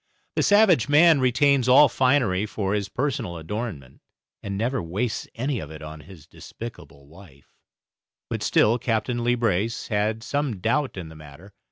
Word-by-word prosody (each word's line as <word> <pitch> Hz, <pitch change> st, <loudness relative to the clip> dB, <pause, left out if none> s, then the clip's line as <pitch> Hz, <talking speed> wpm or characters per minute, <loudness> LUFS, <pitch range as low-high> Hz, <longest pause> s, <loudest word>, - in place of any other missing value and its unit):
The -, -, +1 dB
savage 205 Hz, -, +4 dB
man 155 Hz, +1 st, +6 dB
retains 130 Hz, 0 st, +2 dB
all 140 Hz, +4 st, +7 dB
finery 125 Hz, -7 st, +1 dB
for 100 Hz, -2 st, -3 dB
his 100 Hz, -2 st, -1 dB
own -, -, -29 dB
personal 125 Hz, -10 st, -2 dB
adornment, 80 Hz, -, -6 dB, 0.4 s
and 100 Hz, -1 st, -5 dB
never 120 Hz, +3 st, -1 dB
wastes 105 Hz, +8 st, -3 dB
any 130 Hz, +1 st, -2 dB
of 75 Hz, -, -8 dB
it 80 Hz, 0 st, -10 dB
on 80 Hz, 0 st, -9 dB
his 80 Hz, -1 st, -14 dB
despicable 80 Hz, -9 st, -11 dB
wife, 75 Hz, -3 st, -18 dB, 0.7 s
but -, -, -4 dB
still 115 Hz, +3 st, +2 dB
Captain 120 Hz, 0 st, -1 dB
Leebrace 115 Hz, -3 st, -1 dB
had 110 Hz, +1 st, -1 dB
some 140 Hz, -4 st, -2 dB
doubt 130 Hz, +4 st, -1 dB
in 85 Hz, -4 st, -7 dB
the 80 Hz, -, -13 dB
matter. 75 Hz, +6 st, -14 dB
110 Hz, 160 wpm, -24 LUFS, 90-125 Hz, 0.7 s, all